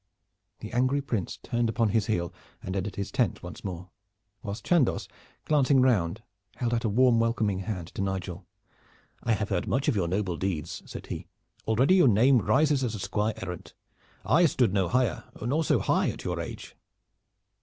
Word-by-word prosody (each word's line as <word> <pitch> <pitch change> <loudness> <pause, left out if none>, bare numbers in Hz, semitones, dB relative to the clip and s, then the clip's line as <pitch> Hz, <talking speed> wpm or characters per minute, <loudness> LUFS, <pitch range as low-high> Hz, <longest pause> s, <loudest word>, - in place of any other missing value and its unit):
The 110 - -7
angry 130 +3 +2
Prince 115 -10 -3
turned 120 -1 0
upon 115 0 +1
his 110 -1 +1
heel 90 -5 -1 0.3
and 95 - -4
entered 100 +1 -3
his 100 0 -4
tent 120 -5 0
once 90 0 -9
more, 90 -2 -6 0.5
whilst 100 +2 -6
Chandos, 170 -8 +2 0.4
glancing 140 -3 +3
round, 110 -5 +2 0.3
held 120 -1 -1
out 115 - 0
a 115 - +1
warm 120 +2 +4
welcoming 115 -4 +1
hand 90 -3 -4
to - - -5
Nigel. 95 -1 -4 0.7
"I 115 - +1
have 105 -1 -2
heard 95 -4 -1
much 135 +4 0
of 145 - +3
your 95 -4 +1
noble 90 -1 -1
deeds," 85 -4 -3
said - - -8
he. - - -6 0.4
"Already 125 +10 +4
your 175 - +6
name 120 +4 +5
rises 140 +3 +2
as 115 -3 -1
a - - -6
squire 105 +3 -1
errant. 90 -1 -7 0.5
I 175 0 +5
stood 125 -9 +1
no 95 -3 +2
higher, 120 +2 0
nor 140 +9 0
so - - +3
high, - - +1
at - - -6
your - - -2
age." - - -7
110 Hz, 180 wpm, -28 LUFS, 95-125 Hz, 0.7 s, your